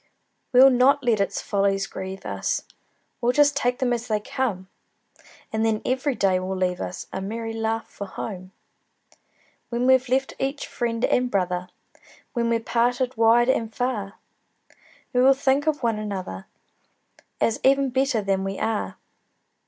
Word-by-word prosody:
We'll 260 +2 +8
not 270 +3 +4
let 235 -4 +2
its 200 - -1
follies 195 -1 +1
grieve 190 0 -7
us, - - -2 0.6
We'll 245 +1 +2
just 290 +1 +4
take 250 -3 +1
them 255 -2 +1
as 240 0 -3
they 215 -1 +1
come; 210 -4 -3 0.9
And 220 0 0
then 220 -1 +1
every 260 +2 0
day 190 -4 +2
will 185 +1 -3
leave 180 -1 -1
us 180 - -5
A 190 - -3
merry 225 +3 -4
laugh 225 0 -2
for 200 - -8
home. 185 -2 -7 1.2
When 240 +1 -1
we've 260 -1 +4
left 265 +1 +1
each 275 +2 -2
friend 235 -1 -1
and 250 0 +1
brother, 180 -3 -1 0.6
When 235 -1 0
we're 230 0 +2
parted 245 +2 0
wide 230 +2 +4
and 225 -4 +1
far, 220 -5 -2 1.0
We 250 - +3
will 270 +1 +6
think 275 +2 +1
of 300 -3 0
one 225 -2 +1
another, 190 - -5 0.9
As 225 - +1
even 275 0 +3
better 260 -4 +1
than 195 -1 0
we 195 0 -3
are. 220 -1 -2
230 Hz, 155 wpm, -24 LUFS, 195-255 Hz, 1.2 s, We'll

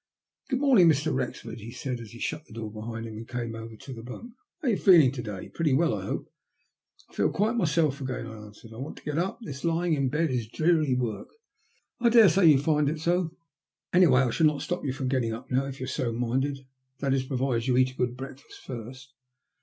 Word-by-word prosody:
"Good 260 -2 0
morning, 245 -12 +6
Mr. 150 0 +2
Wrexford," 125 -3 -4
he 110 +2 -9
said, 125 0 -4
as 115 -2 -9
he 120 - -12
shut 155 +5 -4
the - - -14
door 110 -1 -6
behind 115 +1 -6
him 110 -1 -7
and 115 +1 -8
came 120 -2 -4
over 115 0 -8
to 135 +5 -9
the 115 - -8
bunk. 175 - -9
*' - - -65
How - - -1
are - - +4
you 200 - +1
feeling 165 -10 +6
to 130 -2 -5
day? 105 -5 -7
Pretty 155 -5 0
well, 160 +5 +3
I 100 -3 -4
hope? - - -4 0.3
" - - -46
" - - -29
I - - -23
feel - - +2
quite 215 +4 0
myself 155 - +1
again," 130 -3 -3
I 110 - -8
answered. 110 +2 -14
I - - -11
want 135 +5 -6
to - - -13
get 150 +1 -2
up. 185 +3 -1
This 140 -7 -7
lying 170 0 +1
in 140 -3 +1
bed 150 +2 0
is 120 -3 -1
dreary 155 +1 +2
work." 120 -4 -3 0.4
*' - - -43
I 235 - +5
daresay 195 -6 +6
you 150 -3 +7
find 150 +1 +2
it 155 +1 -3
so. 175 +1 0 0.6
Anyway, 165 -8 +6
I'll 125 -3 +1
not 150 -2 +3
stop 175 - -3
you 140 - -1
from 135 0 -3
getting 125 -4 0
up 115 +4 -9
now, 130 +2 +1
if 135 0 -7
you're 130 - -3
so 130 -3 -2
minded; 130 +4 -1 0.3
that 135 0 0
is'provided 130 -2 -1
you 125 -1 +3
eat 130 0 +4
a - - -17
good 125 -1 -1
breakfast 135 +1 -10
first." 130 +2 -8
135 Hz, 240 wpm, -27 LUFS, 120-160 Hz, 0.6 s, you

